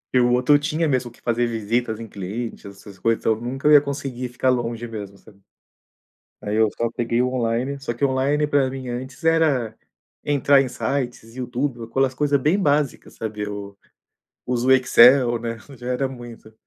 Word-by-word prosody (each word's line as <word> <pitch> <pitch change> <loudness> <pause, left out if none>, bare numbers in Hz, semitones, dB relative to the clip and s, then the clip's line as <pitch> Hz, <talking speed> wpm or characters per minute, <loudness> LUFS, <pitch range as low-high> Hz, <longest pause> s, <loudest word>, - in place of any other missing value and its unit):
E 125 - +4
o 120 0 +3
outro 125 +4 +4
tinha 155 +2 -1
mesmo 130 -3 0
que - - -22
fazer 120 0 0
visitas 115 0 -1
em 115 - -7
clientes, 105 +4 -6
essas 100 0 -12
coisas. 115 0 +1
Então, 110 - +3
nunca 125 +4 -6
eu - - +6
ia 150 - +9
conseguir 140 -3 -4
ficar 125 +1 -1
longe 120 -2 -1
mesmo, 105 -4 -8
sabe. 100 0 -19 1.0
Aí, 105 +1 -3
eu 110 0 +4
só 115 -1 0
peguei 115 0 -1
o 125 - +2
online. 125 +2 -1
Só 135 -3 -4
que 120 - -12
o 140 - +4
online 140 +3 +1
pra 140 -3 +2
mim, 130 -1 -7
antes, 125 +2 -6
era 160 -8 +2 0.5
entrar 140 -1 +4
em 135 - -4
sites, 125 -3 -4
YouTube, 125 0 -3
ou - - -5
aquelas 130 +3 0
coisa 145 +1 +1
bem 155 +8 +2
básicas, 145 -6 0
sabe, 110 -2 -5
eu 100 -1 -6 0.7
uso 125 0 -1
o - - +6
Excel, 125 -1 +6
né, 115 0 -4 0.2
já 120 +1 -8
era 125 +2 0
muito. 120 -4 -11
125 Hz, 190 wpm, -22 LUFS, 115-135 Hz, 1.0 s, ia